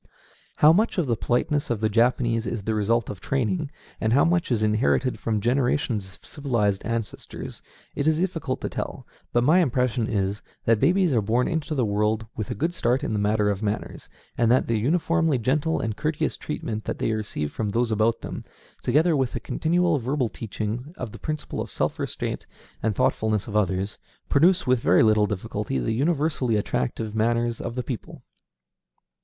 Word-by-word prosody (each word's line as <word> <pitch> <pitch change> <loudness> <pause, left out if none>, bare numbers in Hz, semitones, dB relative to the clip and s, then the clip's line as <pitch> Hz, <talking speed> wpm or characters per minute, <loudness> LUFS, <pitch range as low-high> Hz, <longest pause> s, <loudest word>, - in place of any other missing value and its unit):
How 150 +2 +7
much 215 +5 +2
of 175 - +2
the 120 -3 +1
politeness 125 +6 0
of 120 -3 0
the 110 - +2
Japanese 115 0 +2
is 105 0 -3
the 110 - -1
result 110 +2 +1
of 100 - -9
training, 140 +4 -1 0.3
and 110 +1 +1
how 140 - +5
much 170 -3 +1
is 110 -3 +2
inherited 110 +4 +1
from 110 -2 0
generations 125 -2 +1
of 95 - -18
civilized 115 -9 0
ancestors, 115 -1 -5 0.3
it 140 - -1
is 160 -1 +4
difficult 165 -7 -2
to - - -2
tell; - - -5 0.3
but 120 - +2
my 160 +8 +5
impression 125 -6 +1
is, 100 -2 -1 0.2
that 115 -2 +4
babies 175 - +3
are 115 - +3
born 115 +5 +1
into 160 -2 -2
the 130 -4 +2
world 105 +1 0
with 110 - -4
a - - -2
good 165 +4 -1
start 125 -5 +1
in - - -1
the 105 - 0
matter 105 0 +2
of 100 0 -3
manners, 105 -1 -3 0.3
and 115 -1 +3
that 130 - +4
the 115 -2 0
uniformly 165 +3 +2
gentle 145 +7 +1
and 110 -2 -2
courteous 155 +6 -1
treatment 110 -7 -4
that - - -3
they - - 0
receive 105 -9 -3
from 110 -2 -2
those 115 +2 0
about 110 +2 +2
them, - - -6 0.4
together 155 +6 +3
with 130 -3 0
the - - -2
continual 165 +5 +1
verbal 130 0 0
teaching 115 - -5
of 120 -4 -5
the - - -10
principle 155 -1 -4
of - - -5
self - - -2
restraint - - -3 0.3
and 110 -2 0
thoughtfulness 110 0 +1
of 105 - -6
others, 95 -1 0 0.3
produce 175 +6 +4
with 125 -1 +3
very - - +4
little 110 -1 +4
difficulty 95 -8 -3
the 60 - -1
universally 140 -3 +1
attractive 105 - -1
manners 115 +1 +1
of 115 - -5
the 125 - -2
people. 120 -5 -7
120 Hz, 185 wpm, -25 LUFS, 110-145 Hz, 0.4 s, How